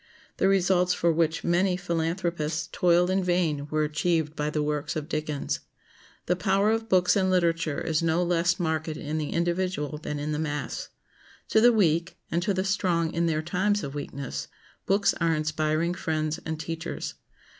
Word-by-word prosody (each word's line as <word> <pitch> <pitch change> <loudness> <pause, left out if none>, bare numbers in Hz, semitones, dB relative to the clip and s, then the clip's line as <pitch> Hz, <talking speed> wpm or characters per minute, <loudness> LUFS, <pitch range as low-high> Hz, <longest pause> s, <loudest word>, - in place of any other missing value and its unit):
The - - +3
results 180 -2 +3
for 170 - +2
which 165 0 +1
many 180 +1 +2
philanthropists 165 -2 -2
toiled 180 0 +3
in 190 0 +1
vain 170 -5 0
were 155 0 +1
achieved 155 0 0
by 150 -1 -1
the 150 0 -1
works 150 -1 -2
of 155 -1 -3
Dickens. 150 -3 -2 0.7
The 180 - +2
power 195 +3 +2
of 225 0 -1
books 180 -1 +4
and 190 -2 +2
literature 165 -4 +1
is 160 -1 0
no 165 +1 +2
less 175 0 +1
marked 160 -2 -1
in 155 +2 -3
the 150 - -3
individual 170 -3 -1
than 150 -1 -4
in 145 +1 -3
the 150 - -1
mass. 150 - -3 0.6
To 220 - +4
the 240 +1 +7
weak, 175 -4 +1
and 170 - +1
to 200 +3 0
the 185 0 0
strong 175 -4 +1
in 170 0 +1
their 155 -1 0
times 200 +5 0
of 135 - -5
weakness, 140 -2 -5 0.4
books 200 +1 +3
are 165 -1 +3
inspiring 155 +2 0
friends 155 -2 -2
and 160 -1 -3
teachers. 165 +1 -4
170 Hz, 175 wpm, -27 LUFS, 155-180 Hz, 0.7 s, the